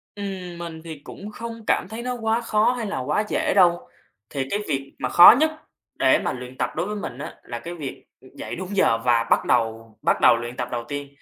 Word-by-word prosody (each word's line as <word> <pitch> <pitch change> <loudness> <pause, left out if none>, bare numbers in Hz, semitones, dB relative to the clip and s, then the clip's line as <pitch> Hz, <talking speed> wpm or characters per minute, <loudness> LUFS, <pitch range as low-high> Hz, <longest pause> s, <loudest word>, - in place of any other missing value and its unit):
Ừm, 190 -4 -6
mình 165 -2 -7
thì 160 -3 -8
cũng 210 +1 -9
không 230 +1 -7
cảm - - +1
thấy 225 +2 -6
nó 250 0 -2
quá 225 0 0
khó 225 +1 +2
hay 240 -3 -3
là 165 - -3
quá 150 +11 0
dễ - - 0
đâu. 175 -2 +4 0.4
Thì 135 -1 -3
cái 205 - 0
việc 135 -2 -3
mà - - -2
khó 175 +7 +10
nhất 315 0 +3 0.5
để - - +5
mà - - -2
luyện 125 +1 -9
tập 125 - 0
đối 170 +3 -1
với 210 - -3
mình 185 -10 -6
á 145 - -7
là 120 - -6
cái 170 - -7
việc 145 -5 -7 0.3
dậy - - -6
đúng 185 +2 -6
giờ 115 - +4
và 115 0 +2
bắt - - +3
đầu 115 -2 0
bắt - - +1
đầu - - +6
luyện 120 +1 -6
tập 125 -1 -2
đầu 120 -1 -3
tiên. 145 -1 -5
170 Hz, 235 wpm, -23 LUFS, 125-210 Hz, 0.5 s, khó